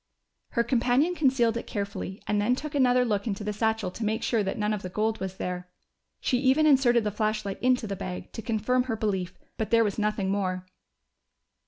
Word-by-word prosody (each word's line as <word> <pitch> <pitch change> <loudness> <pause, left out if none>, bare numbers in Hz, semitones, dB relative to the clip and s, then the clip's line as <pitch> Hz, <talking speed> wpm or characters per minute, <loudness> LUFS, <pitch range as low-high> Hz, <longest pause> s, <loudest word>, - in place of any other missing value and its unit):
Her 235 - +3
companion 250 +7 +2
concealed 255 -7 +2
it - - -6
carefully 200 -1 -4
and 210 0 +1
then 240 +5 +2
took 300 +2 -6
another 250 -3 +4
look 205 -2 -1
into 205 -1 -2
the 210 0 -2
satchel 220 -2 0
to 225 - -6
make 220 +1 -1
sure 230 -3 +1
that 195 -1 -2
none 210 0 0
of 210 - -3
the 185 - -5
gold 220 +4 -1
was 190 0 -5
there. 180 0 -4 0.5
She 250 - +1
even 270 +4 +4
inserted 255 -5 +5
the 210 - -1
flashlight 215 -1 -2
into 250 -2 +2
the 200 -2 -3
bag, 180 -1 -6
to - - -6
confirm 240 +3 +1
her 240 -3 -1
belief. 190 -4 -2 0.2
But 220 -2 -2
there 230 +1 +5
was 210 -1 -1
nothing 210 -2 0
more. 185 -2 -1
220 Hz, 205 wpm, -27 LUFS, 200-245 Hz, 0.5 s, inserted